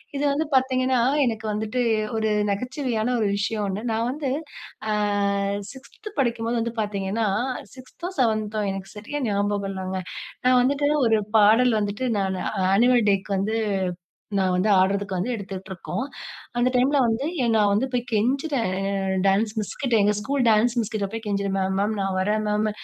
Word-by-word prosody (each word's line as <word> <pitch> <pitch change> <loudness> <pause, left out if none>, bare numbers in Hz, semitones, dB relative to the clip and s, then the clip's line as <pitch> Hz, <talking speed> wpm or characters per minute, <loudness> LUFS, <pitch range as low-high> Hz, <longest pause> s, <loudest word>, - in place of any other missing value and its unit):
இது 280 - -1
வந்து 305 +3 0
பாத்தீங்கன்னா, 255 -1 +2 0.3
எனக்கு 225 -2 -2
வந்துட்டு 220 +4 -2 0.4
ஒரு 220 0 +1 0.2
நகைச்சுவையான 250 +1 -1
ஒரு 210 - +2
விஷயம் 210 +1 -1
ஒண்ணு, 195 +3 -3
நான் 225 +1 0
வந்து, 285 0 -3 0.6
அ, - - +1 0.8
6த் 275 +10 -11
படிக்கும்போது 235 -2 0
வந்து 230 0 -3
பாத்தீங்கன்னா, 205 +1 -1 0.5
6தோ 265 +7 -8
7தோ 215 -3 +1
எனக்கு 195 0 -7
சரியா 290 +8 -5
ஞாபகம் 205 0 0
இல்லங்க. 190 0 -4 0.5
நான் 255 0 +5
வந்துட்டு 280 +3 +1 0.2
ஒரு 220 -1 +3 0.2
பாடல் 220 +2 +5
வந்துட்டு 205 +5 -2
நான் 190 -1 -1 0.3
ஆனிவல் 240 +1 +4
டேக்கு 195 +1 -1
வந்து, 215 +3 0 0.8
நான் 190 -1 +2
வந்து 185 +4 +1
ஆடுறதுக்கு 195 +1 +1
வந்து 200 +8 -1
எடுத்துக்கிட்டு 195 -3 -7
இருக்கோம். 185 +7 -4 0.5
அந்த 245 +1 +3
டைம்ல 265 +4 +3
வந்து, 230 +4 0 0.2
எங் 235 -1 +2
நான் 205 -1 +3
வந்து 210 +6 +2
போயி 245 -1 0
கெஞ்சிறேன், 245 - 0 0.5
டான்ஸ் 205 +3 +2
மிஸ்கிட்ட. 235 +3 -1
எங்க 210 +1 +3
ஸ்கூல் 270 +5 0
டான்ஸ் 225 +3 +3
மிஸ்கிட்ட 215 -3 -2
போயி 225 - -3
கெஞ்சிறேன், 200 -1 -1
"மேம், 190 0 0
மேம் 210 +2 0
நான் 195 -1 -1
வரேன் 210 +3 +1
மேம். 210 +1 +1
220 Hz, 155 wpm, -24 LUFS, 200-250 Hz, 0.8 s, நான்